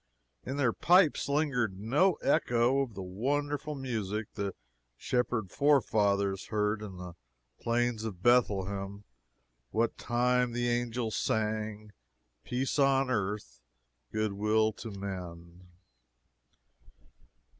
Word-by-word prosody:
In 135 Hz, -, -4 dB
their 130 Hz, -5 st, +2 dB
pipes 175 Hz, -4 st, +4 dB
lingered 130 Hz, -10 st, 0 dB
no 145 Hz, -, +3 dB
echo 125 Hz, 0 st, +3 dB
of 120 Hz, -6 st, -4 dB
the 95 Hz, -, -5 dB
wonderful 145 Hz, +9 st, -2 dB
music 110 Hz, -6 st, -3 dB
the 100 Hz, -2 st, -3 dB, 0.4 s
shepherd 120 Hz, -, -1 dB
forefathers 100 Hz, -9 st, +2 dB
heard 105 Hz, 0 st, 0 dB
in 100 Hz, -4 st, -7 dB
the 90 Hz, -1 st, -8 dB, 0.5 s
Plains 120 Hz, -1 st, 0 dB
of 95 Hz, -5 st, -6 dB
Bethlehem 100 Hz, -4 st, +1 dB, 0.7 s
what 115 Hz, +1 st, 0 dB
time 125 Hz, 0 st, +1 dB
the 120 Hz, 0 st, 0 dB
angels 120 Hz, -2 st, -1 dB
sang 110 Hz, 0 st, -2 dB, 0.5 s
"Peace 130 Hz, +3 st, -1 dB
on 135 Hz, -1 st, +3 dB
earth, 100 Hz, -, -3 dB, 0.5 s
good 110 Hz, -1 st, -1 dB
will 110 Hz, +2 st, +2 dB
to 115 Hz, -, -8 dB
men." 90 Hz, -3 st, -7 dB
110 Hz, 105 wpm, -30 LUFS, 100-125 Hz, 0.7 s, pipes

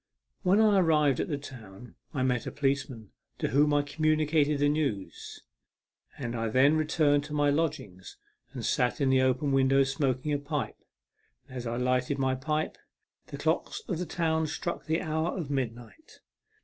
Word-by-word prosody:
When 195 Hz, +2 st, +3 dB
I 210 Hz, -3 st, +5 dB
arrived 150 Hz, -6 st, +3 dB
at -, -, -1 dB
the 145 Hz, -, -2 dB
town 120 Hz, -5 st, -11 dB, 0.2 s
I 135 Hz, -4 st, -1 dB
met 125 Hz, -2 st, 0 dB
a -, -, -3 dB
policeman, 135 Hz, -6 st, -2 dB, 0.3 s
to -, -, -2 dB
whom 145 Hz, +2 st, +3 dB
I 145 Hz, 0 st, +3 dB
communicated 155 Hz, 0 st, +1 dB
the 145 Hz, +1 st, +2 dB
news, 145 Hz, -10 st, -3 dB, 0.7 s
and 120 Hz, -3 st, -4 dB
I 115 Hz, -1 st, -1 dB
then 135 Hz, +6 st, +4 dB
returned 150 Hz, -2 st, +2 dB
to 150 Hz, -, -8 dB
my 145 Hz, -1 st, +3 dB
lodgings 145 Hz, -, -3 dB, 0.3 s
and 125 Hz, -5 st, -6 dB
sat 125 Hz, -3 st, +1 dB
in 135 Hz, -2 st, +2 dB
the 130 Hz, 0 st, +4 dB
open 130 Hz, +2 st, +1 dB
window 135 Hz, 0 st, +4 dB
smoking 135 Hz, +1 st, -1 dB
a 145 Hz, -, 0 dB
pipe, 145 Hz, 0 st, -4 dB, 0.7 s
and 130 Hz, -, -12 dB
as 125 Hz, -1 st, -5 dB
I 115 Hz, +1 st, -2 dB
lighted 125 Hz, +2 st, 0 dB
my 130 Hz, -1 st, +1 dB
pipe 150 Hz, +4 st, -2 dB, 0.5 s
the -, -, -7 dB
clocks -, -, -1 dB
in 190 Hz, -, -1 dB
the 180 Hz, 0 st, -4 dB
town 160 Hz, -1 st, 0 dB
struck 170 Hz, +3 st, -4 dB
the 160 Hz, +3 st, 0 dB
hour 160 Hz, +2 st, -1 dB
of 155 Hz, -6 st, -4 dB
mid 130 Hz, -5 st, -1 dB
night. 120 Hz, -, -16 dB
145 Hz, 175 wpm, -28 LUFS, 130-155 Hz, 0.7 s, I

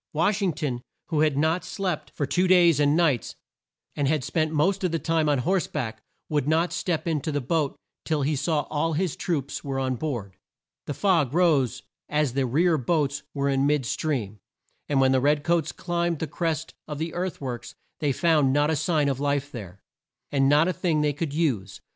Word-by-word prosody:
Wash 195 Hz, +7 st, +1 dB
ing 185 Hz, -4 st, +1 dB
ton, 140 Hz, -5 st, -3 dB, 0.3 s
who 155 Hz, -, 0 dB
had 150 Hz, -2 st, +2 dB
not 160 Hz, +4 st, +1 dB
slept 185 Hz, -4 st, -3 dB
for 145 Hz, -, -1 dB
two 175 Hz, +7 st, +1 dB
days 175 Hz, -5 st, +5 dB
and 145 Hz, +1 st, +3 dB
nights, 150 Hz, -9 st, +1 dB, 0.6 s
and 145 Hz, -2 st, 0 dB
had 150 Hz, -2 st, +1 dB
spent 155 Hz, +4 st, 0 dB
the 160 Hz, -, -5 dB
most 190 Hz, +6 st, +2 dB
of 180 Hz, -, +1 dB
the 165 Hz, -, +1 dB
time 160 Hz, -1 st, +1 dB
on 145 Hz, -, +3 dB
horse 180 Hz, +8 st, +1 dB
back, 110 Hz, -7 st, -4 dB, 0.3 s
would 145 Hz, -2 st, 0 dB
not 165 Hz, +3 st, +2 dB
step 170 Hz, -1 st, -2 dB
in 155 Hz, -3 st, 0 dB
to 155 Hz, -, -3 dB
the 145 Hz, -, 0 dB
boat 145 Hz, +2 st, 0 dB, 0.3 s
till 155 Hz, -3 st, 0 dB
he 150 Hz, +2 st, +1 dB
saw 150 Hz, +1 st, 0 dB
that -, -, -20 dB
all 160 Hz, +2 st, 0 dB
his 170 Hz, +1 st, -1 dB
troops 145 Hz, -6 st, -3 dB
were 135 Hz, -1 st, -3 dB
on 130 Hz, -1 st, 0 dB
board. 120 Hz, -9 st, -4 dB, 0.5 s
The 145 Hz, -, -3 dB
fog 165 Hz, -9 st, +2 dB
rose 140 Hz, -8 st, +2 dB, 0.3 s
as 150 Hz, -4 st, +1 dB
the 135 Hz, -1 st, 0 dB
rear 160 Hz, +5 st, +2 dB
boats 145 Hz, +1 st, 0 dB
were 140 Hz, 0 st, 0 dB
in 135 Hz, 0 st, +2 dB
mid 145 Hz, -3 st, +1 dB
stream, 115 Hz, -7 st, -2 dB, 0.5 s
and 140 Hz, -2 st, +2 dB
when 130 Hz, 0 st, +4 dB
the 130 Hz, -1 st, +3 dB
red 145 Hz, +1 st, +2 dB
coats 165 Hz, -3 st, +1 dB
climbed 170 Hz, +1 st, -1 dB
the 160 Hz, -, -2 dB
crest 160 Hz, -1 st, -2 dB
of 150 Hz, -1 st, -5 dB
the 160 Hz, +2 st, -3 dB
earth 180 Hz, +1 st, -3 dB
works 125 Hz, -4 st, -6 dB, 0.2 s
they 145 Hz, -2 st, +1 dB
found 150 Hz, -2 st, +3 dB
not 145 Hz, +3 st, +2 dB
a -, -, +1 dB
sign 150 Hz, -1 st, +1 dB
of 135 Hz, -2 st, -1 dB
life 145 Hz, 0 st, -1 dB
there, 100 Hz, -6 st, -9 dB, 0.5 s
and 135 Hz, -1 st, +3 dB
not 150 Hz, +3 st, +5 dB
a 185 Hz, -, +1 dB
thing 165 Hz, -5 st, 0 dB
they 150 Hz, -1 st, +1 dB
could 150 Hz, +1 st, -3 dB
use. 130 Hz, -, -1 dB
150 Hz, 215 wpm, -25 LUFS, 135-165 Hz, 0.6 s, days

